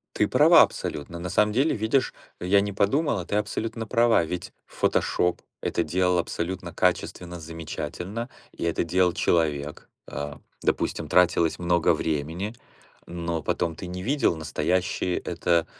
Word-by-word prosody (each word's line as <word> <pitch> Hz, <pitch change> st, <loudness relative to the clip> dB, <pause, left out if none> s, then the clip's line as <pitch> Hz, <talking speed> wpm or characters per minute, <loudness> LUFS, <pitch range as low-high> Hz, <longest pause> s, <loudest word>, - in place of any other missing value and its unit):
Ты -, -, +2 dB
права -, -, +7 dB
абсолютно. 80 Hz, +4 st, -1 dB
На 90 Hz, +1 st, -5 dB
самом 105 Hz, +3 st, +2 dB
деле, 135 Hz, +7 st, +2 dB
видишь, 110 Hz, +5 st, +1 dB, 0.3 s
я 100 Hz, +3 st, +3 dB
не 100 Hz, 0 st, -2 dB
подумал, 120 Hz, +7 st, +1 dB
а 90 Hz, -, -4 dB
ты 105 Hz, -, -3 dB
абсолютно 110 Hz, +2 st, -2 dB
права. 115 Hz, -6 st, +4 dB
Ведь 85 Hz, +2 st, -5 dB
"Фотошоп" 90 Hz, 0 st, 0 dB, 0.2 s
это -, -, 0 dB
делал 90 Hz, +2 st, +1 dB
абсолютно 90 Hz, +1 st, -3 dB
качественно, 90 Hz, -1 st, -1 dB
замечательно, 85 Hz, +7 st, -5 dB, 0.2 s
и -, -, -7 dB
это 85 Hz, 0 st, 0 dB
делал 90 Hz, +1 st, +2 dB
человек. 75 Hz, -4 st, 0 dB, 0.2 s
Э, 70 Hz, 0 st, -5 dB, 0.3 s
допустим, -, -, -1 dB
тратилось 85 Hz, -2 st, +3 dB
много 85 Hz, -1 st, +2 dB
времени, 80 Hz, +7 st, -2 dB, 0.5 s
но 85 Hz, -2 st, -3 dB
потом 80 Hz, +2 st, -1 dB
ты 90 Hz, -, -7 dB
не 90 Hz, +1 st, -6 dB
видел, 135 Hz, -, +2 dB
настоящие 90 Hz, +3 st, -1 dB
это, 85 Hz, -1 st, 0 dB
90 Hz, 140 wpm, -26 LUFS, 85-100 Hz, 0.5 s, права